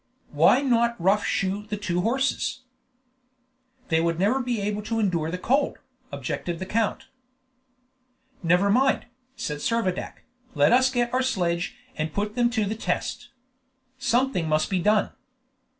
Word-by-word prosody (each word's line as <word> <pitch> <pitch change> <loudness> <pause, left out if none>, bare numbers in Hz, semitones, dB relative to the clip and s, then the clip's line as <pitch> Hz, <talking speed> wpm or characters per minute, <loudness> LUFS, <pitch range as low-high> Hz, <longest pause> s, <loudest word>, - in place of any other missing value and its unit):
"Why 265 - +5
not 235 -4 +2
rough 195 +4 +3
shoe 195 +2 -1
the 210 0 -3
two 180 -3 -1
horses?" 260 +3 0 1.3
"They 160 -1 +3
would 165 0 0
never 215 +9 +2
be 245 -3 -2
able 205 +1 -2
to 225 +2 -3
endure 170 -7 0
the 180 - -3
cold," 270 +10 +1 0.3
objected 140 +5 -4
the 185 - -5
count. 220 +2 -1 1.4
"Never 180 +4 +3
mind," 265 +4 +2 0.3
said 150 - -4
Servadac, 190 0 -2 0.3
"let 145 +9 +4
us 260 +1 +5
get 245 -2 -1
our 255 - +2
sledge 180 -9 -1 0.2
and 155 0 -3
put 210 +1 -2
them 240 0 +2
to 220 -3 0
the 205 - -2
test. 225 - -3 0.7
Something 250 -9 +1
must 155 +3 +1
be 190 - +1
done!" 210 +3 +2
210 Hz, 145 wpm, -25 LUFS, 180-240 Hz, 1.4 s, Why